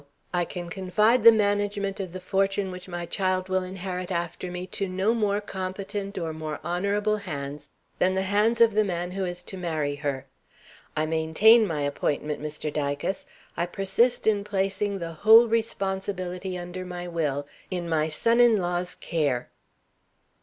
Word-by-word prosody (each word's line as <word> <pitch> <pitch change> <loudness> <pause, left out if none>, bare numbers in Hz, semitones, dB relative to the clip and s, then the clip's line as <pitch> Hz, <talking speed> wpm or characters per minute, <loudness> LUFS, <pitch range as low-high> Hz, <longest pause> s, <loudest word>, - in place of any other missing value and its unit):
I 175 -1 +1
can 175 -1 -6
confide 210 +6 +2
the 230 - +11
management 205 -2 0
of 190 -3 -4
the 185 - -6
fortune 195 +1 0
which 180 0 -9
my 175 -1 -4
child 185 +1 -1
will 185 0 +2
inherit 185 -1 -5
after 175 +1 -3
me 180 0 -5
to 195 -2 -2
no 190 +5 +1
more 210 -3 +1
competent 195 0 -5
or 165 -3 -2
more 155 -1 -5
honorable 200 +5 0
hands 145 -7 -6 0.3
than 185 +1 +3
the 190 - +1
hands 210 +4 +2
of 230 -2 +6
the 215 +1 +4
man 175 -2 -3
who 190 0 -2
is 175 0 -5
to 190 - -7
marry 155 -5 -1
her. 140 -2 -3 0.7
I 155 - +2
maintain 165 +9 +5
my 155 -4 -2
appointment, 145 +1 -1
Mr. 150 0 -4
Dicas! 145 +5 -2 0.3
I 170 - -1
persist 195 +7 +1
in 210 -2 +3
placing 200 0 -1
the 170 -2 -5
whole 220 +8 +7
responsibility 190 -4 -2
under 180 +1 -6
my 180 -1 -6
Will 150 -5 -1 0.2
in 180 -2 -3
my 160 -2 +1
son 230 +10 +2
in 240 -2 +6
law's 180 -1 -2
care." 145 -7 -1
185 Hz, 165 wpm, -26 LUFS, 170-200 Hz, 0.7 s, the